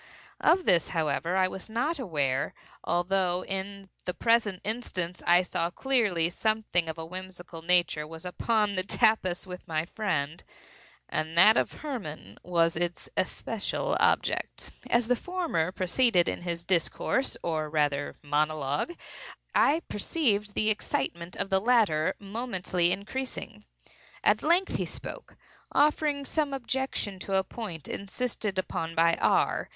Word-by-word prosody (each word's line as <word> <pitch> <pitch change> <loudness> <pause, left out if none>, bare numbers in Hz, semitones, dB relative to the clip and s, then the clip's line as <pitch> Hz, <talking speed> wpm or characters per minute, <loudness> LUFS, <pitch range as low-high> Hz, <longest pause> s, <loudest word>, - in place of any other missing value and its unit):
Of 360 +2 +4
this, 170 -2 +4
however, 165 +3 0
I 185 -1 +4
was 190 +3 -7
not 280 +8 -1
aware; 145 - -1 0.3
although, 180 0 +1
in 195 0 -5 0.2
the 180 - -3
present 230 -5 +2
instance, 185 -6 -4
I 175 +1 +6
saw 170 -1 -1
clearly 205 -7 +1
that 175 - -7
something 215 -6 0
of 160 - -4
a 160 - -5
whimsical 180 -1 -8
nature 170 -3 +2
was 160 +2 -10
upon 210 +3 +1
the 185 - 0
tapis 195 -3 +2
with 180 -1 -9
my 155 0 -1
friend, 170 -6 -2 0.6
and 160 +2 -3
that 210 +5 +8
Hermann 160 - -3
was 165 -1 +2
its 175 +1 -3
especial 210 +3 -1
object. - - +1 0.2
As 235 0 +3
the 250 - +3
former 335 - -1
proceeded 185 0 +2
in - - -2
his 170 -1 -4
discourse, 185 +9 0
or 155 -2 -1
rather 145 -2 0
monologue, 150 - 0 0.6
I 320 +4 +4
perceived 210 -4 0
the 215 0 +3
excitement 170 -4 -2
of 195 - -3
the 190 0 +3
latter 210 -10 +3
momently 195 -5 -1
increasing. 210 - -5 0.6
At 210 +1 +4
length 350 +5 +2
he - - -1
spoke; - - -7 0.3
offering 295 -1 +2
some 290 -1 0
objection 260 -6 -2
to 195 +1 -2
a 190 - +3
point 185 - -6
insisted 205 -1 -3
upon 165 -3 -2
by 165 +1 +5
R. - - +2
185 Hz, 135 wpm, -28 LUFS, 170-225 Hz, 0.6 s, that